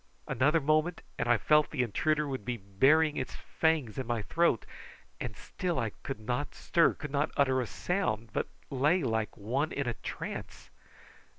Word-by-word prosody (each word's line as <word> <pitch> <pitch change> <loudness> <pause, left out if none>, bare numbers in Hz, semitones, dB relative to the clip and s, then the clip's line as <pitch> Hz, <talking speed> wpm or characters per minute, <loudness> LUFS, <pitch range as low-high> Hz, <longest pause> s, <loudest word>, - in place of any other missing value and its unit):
Another 150 +5 +3
moment 155 +3 +1 0.2
and 120 - 0
I 120 - +6
felt 150 +5 +4
that - - -8
the 125 - +3
intruder 150 +7 +1
would 130 -5 -4
be 120 +1 -2
burying 135 +11 +3
its 130 - -3
fangs 155 -9 0
in 130 - -4
my 120 -3 -1
throat, 165 -2 +2 0.5
and 115 -4 -5
still 180 -3 -3
I 115 -4 0
could 135 - -5
not 125 +6 -3
stir 170 - +3
could 150 -2 -7
not 145 +2 +1
utter 130 -2 +3
sound, 115 - -1
but - - -1 0.2
lay 145 +6 +3
like 110 -3 -1
one 130 +9 -1
in 140 -2 -2
a 120 - 0
trance. - - -7
135 Hz, 175 wpm, -31 LUFS, 120-155 Hz, 0.5 s, I